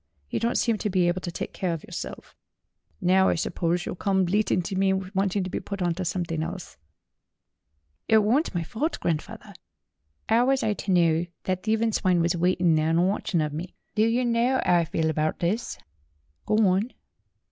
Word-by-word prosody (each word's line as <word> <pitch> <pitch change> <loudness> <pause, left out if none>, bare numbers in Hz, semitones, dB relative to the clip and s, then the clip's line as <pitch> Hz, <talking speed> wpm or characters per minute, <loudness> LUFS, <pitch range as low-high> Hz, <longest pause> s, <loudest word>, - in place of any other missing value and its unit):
You - - 0
don't 235 +2 0
seem 230 -3 +1
to 210 - -1
be 180 -2 +2
able 175 +1 0
to 175 - -4
take - - -5
care 180 -3 -1
of 165 - -6
yourself. - - -8 0.6
Now 190 +1 +4
I - - +2
suppose 170 +1 -1
you'll - - -3
come 190 +1 +1
bleating 190 -1 +1
to 190 +3 -4
me 190 0 +2
wanting 190 +1 -1
to 185 - -4
be - - -2
put 200 -1 -6
on 175 -2 +1
to 185 +2 -4
something 165 -2 -2
else." 175 - -6 1.3
"It 220 - +5
worn't 220 - +2
my 170 - 0
fault, 280 - -3
grandfawther. 160 -3 -3 0.8
'Ow 230 +2 +4
was 270 0 +2
I 215 - +1
ter 200 - -4
know 170 -1 +3 0.2
thet 185 -1 -1
thievin' 220 +1 +1
swine 185 -4 +2
was 170 +1 +1
waitin' 175 -1 +2
theer 155 0 +1
an' 165 +2 +3
watchin' 190 -3 0
of 150 -1 -2
me? 170 +4 -6 0.2
Der 215 +1 +3
yer 240 +2 +1
know 240 +2 +2
'ow 175 - +4
I 170 - +1
feel 160 0 -1
abart 155 0 0
this 205 +8 -2 0.4
?" 75 0 -43
"Go - - +2
on." 195 +6 +1
185 Hz, 200 wpm, -26 LUFS, 170-215 Hz, 1.3 s, It